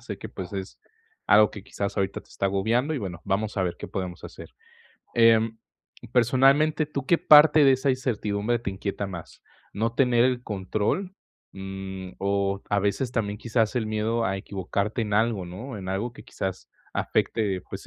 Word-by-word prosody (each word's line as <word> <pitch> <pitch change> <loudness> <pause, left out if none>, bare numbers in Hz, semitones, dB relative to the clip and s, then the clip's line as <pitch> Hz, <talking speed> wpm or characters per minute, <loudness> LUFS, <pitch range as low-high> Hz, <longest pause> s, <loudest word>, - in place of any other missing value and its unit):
Sé - - -7
que, - - -7
pues, 95 0 -8
es 95 -1 -6 0.5
algo 105 0 +6
que, 100 - -9
quizás, 100 -1 -4
ahorita 100 -2 -1
te - - -25
está - - -5
agobiando, 110 +9 +1
y, - - -1
bueno, 90 -7 -6
vamos 105 +2 -1
a 95 - +1
ver 90 -2 -2
qué - - -7
podemos 90 -2 -5
hacer. - - -11 0.6
Em, 115 -1 +4 0.5
personalmente, 135 +5 +4
¿tú 140 -3 -4
qué 170 - +4
parte 150 0 +7
de 135 -1 +7
esa 130 +1 +1
incertidumbre 120 -3 -1
te 115 -4 -4
inquieta 100 +1 -4
más? 85 -4 -9 0.3
¿No 115 +3 -1
tener 125 -2 +4
el 125 -1 +1
control, 110 - -2 0.4
mm, 95 -1 -7
o, 100 0 0
a 105 - +2
veces, 100 +6 0
también, 105 -4 -2
quizás, 115 0 0
el 115 -3 0
miedo 110 +2 0
a 95 - -1
equivocarte 100 +3 -3
en 105 -2 -2
algo, 110 -3 +1
no? 105 +7 -7
En 95 -1 -7
algo 100 +6 -2
que, - - -13
quizás, 95 -1 -5 0.2
afecte, 100 -5 0
pues, - - -7
105 Hz, 180 wpm, -26 LUFS, 95-120 Hz, 0.6 s, parte